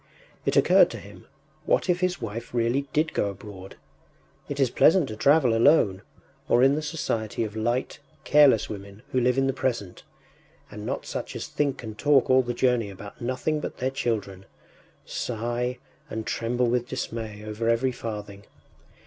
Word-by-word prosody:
It - - +2
occurred - - +6
to - - -7
him: - - -13 0.4
what - - +2
if 180 -1 +2
his 180 -3 0
wife 115 +2 -6
really 120 +4 +1
did 155 +1 +1
go 100 - 0
abroad? 95 -1 -10 0.7
It 145 0 -4
is 130 -3 +2
pleasant 165 -3 +4
to 110 - -5
travel 135 0 +4
alone, 115 -6 +4 0.5
or 120 +1 +5
in 135 +1 +5
the 150 - -1
society 115 -9 -2
of 110 -1 -5
light, 120 +6 -1 0.2
careless 140 -6 +5
women 100 +1 -9
who 130 - +2
live 125 +1 +2
in 135 - +3
the 135 - +1
present, 115 -8 -3 0.7
and 105 +1 -7
not - - -3
such - - -5
as - - -4
think 140 -4 -1
and 110 -2 -8
talk 145 -3 +4
all 130 0 +6
the 120 -1 -4
journey 125 -4 +1
about 100 +1 -11
nothing 130 +5 -1
but - - -6
their 130 +1 -1
children, 100 -7 -3 0.6
sigh, 120 +2 -3 0.3
and 110 0 -4
tremble 120 +2 0
with 120 0 0
dismay 110 -4 -5
over 110 +2 -2
every 120 +3 +2
farthing. 105 -4 -7
120 Hz, 170 wpm, -26 LUFS, 110-135 Hz, 0.7 s, occurred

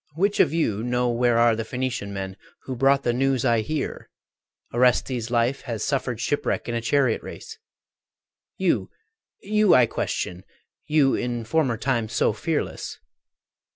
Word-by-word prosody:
Which 200 +5 +1
of - - +5
you 115 -11 0
know 125 +1 0
where 120 0 +2
are 115 -1 +4
the 115 - -3
Phocian 125 -3 -3
men 95 -1 -5 0.3
Who 130 - -5
brought 135 +2 +3
the 120 - +1
news 135 0 +1
I 115 -2 +3
hear, 155 +7 -4 0.6
Orestes' 125 -1 +2
life 120 +3 +1
Hath 115 -5 -4
suffered 130 -4 -1
shipwreck 145 +5 -1
in 120 - -2
a 115 - -1
chariot 130 0 +2
race? - - -10 1.0
You, - - +1 0.5
you 210 -1 +4
I 125 -1 +6
question, 90 -4 -3 0.4
you 150 -3 +3
in 120 -1 -2
former 130 -3 +1
time 120 -3 -1
So - - +1
fearless! - - -3
125 Hz, 150 wpm, -24 LUFS, 115-135 Hz, 1.0 s, I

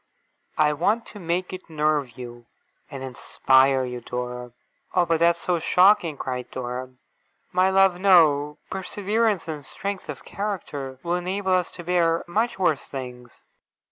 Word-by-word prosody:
I 150 -1 +3
want 215 +10 +1
to 210 - -9
make 180 +1 -2
it 185 -1 -9
nerve 150 -5 0
you, 120 -1 -9 0.4
and 135 -1 -7
inspire 130 +1 +2
you, 125 -1 -6
Dora!' 125 0 -5 0.4
'Oh, 175 - +4
but 165 -1 +1
that's 170 0 +3
so 175 -2 0
shocking!' 180 -2 +4
cried 125 -2 -4
Dora. 125 0 -5 0.6
'My 185 +1 +3
love, 190 -2 +4
no. 150 -6 +4
Perseverance 205 +1 -1
and 155 -3 -5
strength 195 +7 -5
of - - -7
character 150 -10 -5
will 170 - -1
enable 185 +2 -1
us 180 -1 +1
to 175 - -8
bear 170 -1 +2
much 220 +5 0
worse 175 -6 +1
things. 125 -2 -8
165 Hz, 145 wpm, -24 LUFS, 130-185 Hz, 0.6 s, Oh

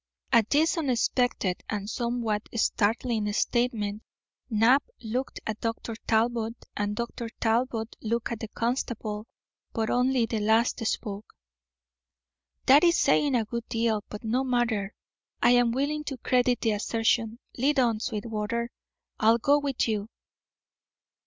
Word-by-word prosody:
At 230 -3 +4
this 320 +4 +3
unexpected 245 - 0
and 205 -2 -3
somewhat 235 -2 -2
startling 220 0 +1
statement 220 -3 0 0.5
Knapp 235 +5 +4 0.2
looked 245 +4 -3
at 215 0 -4
Dr. 230 0 -3
Talbot 230 0 +1 0.2
and 205 0 -1
Dr. 235 0 -4
Talbot 225 0 0
looked 235 +1 -2
at 230 - -3
the 225 - -5
constable, 230 -2 -3 0.5
but 220 -1 -1
only 250 -1 +2
the 225 -1 -2
last 225 +3 +2
spoke. 205 -1 -4 1.3
"That 285 +5 +7
is 340 -1 +5
saying 280 0 +3
a 230 -2 +1
good 235 +1 -5
deal. 225 -2 0
But 210 - -8
no 240 +4 0
matter. 235 -6 0 0.4
I - - +5
am 245 -1 +4
willing 285 +4 -1
to 275 -3 -4
credit 250 0 +1
the 225 - +2
assertion. 225 +2 0 0.2
Lead 275 +2 +2
on, 230 -4 +2
Sweetwater; 225 +1 -3 0.5
I'll 225 +1 +5
go 285 +5 +3
with 275 -4 -1
you." 215 -1 -2
230 Hz, 135 wpm, -27 LUFS, 220-250 Hz, 1.3 s, That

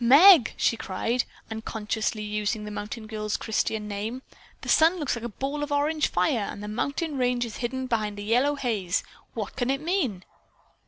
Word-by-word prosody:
"Meg!" 295 - +8
she - - +2
cried, 225 +4 -1 0.3
unconsciously 220 0 -2
using 210 +1 -2
the 210 - -6
mountain 210 +2 -5
girl's 215 -1 -2
Christian 220 -1 -1
name, 215 +5 -4 0.4
"the - - -9
sun 325 +3 +5
looks 295 -7 -1
like 235 - -7
a 240 - -3
ball 275 +6 -3
of 295 0 -3
orange 300 +2 +2
fire 200 +4 +1
and 205 - -8
the - - -5
mountain 280 +7 -2
range 245 -1 +1
is 225 - -7
being - - -7
hidden 260 +2 -2
by 230 -4 0
a - - -5
yellow 235 +8 +1
haze. 215 -9 -1 0.3
What 215 -4 -4
can 245 -1 -1
it 270 0 +1
mean?" 300 - -1
235 Hz, 190 wpm, -26 LUFS, 210-275 Hz, 0.4 s, Meg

